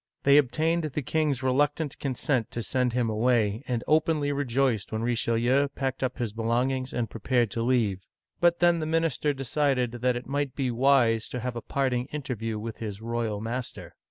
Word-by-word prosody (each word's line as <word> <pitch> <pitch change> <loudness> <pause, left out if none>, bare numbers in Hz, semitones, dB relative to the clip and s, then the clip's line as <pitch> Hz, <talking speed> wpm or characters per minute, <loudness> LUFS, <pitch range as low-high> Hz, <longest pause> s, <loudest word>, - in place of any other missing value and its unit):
They 140 +1 +6
obtained 155 +5 +2
the 150 -1 -3
king's 145 -2 0
reluctant 145 +3 0
consent 130 -3 -1
to 115 0 -4
send 125 -1 0
him 125 -1 +1
away, 110 0 +1
and 120 -2 -1
openly 155 -2 +2
re 145 0 -1
joiced 125 -4 0
when 110 0 -2
Richelieu 120 +3 +2
packed 135 -1 -2
up 130 -1 -1
his 120 -5 -3
belongings 125 +4 0
and 120 -2 -1
pre 110 +1 -10
pared 120 -4 +1
to 115 - -2
leave; 115 -6 +1 0.4
but 175 0 +3
then 175 -1 +4
the 155 - -2
minister 160 -2 +1
decided 135 -2 0
that 125 +1 0
it 120 - -5
might 140 -1 -2
be 130 -3 -1
wise 120 -3 +3
to 125 - -4
have 125 0 -3
a 120 - -4
parting 130 -2 -1
interview 125 -7 -4
with 110 +1 -6
his 105 -3 -5
royal 115 -2 -2
master. 120 +2 -5
125 Hz, 185 wpm, -27 LUFS, 115-140 Hz, 0.4 s, They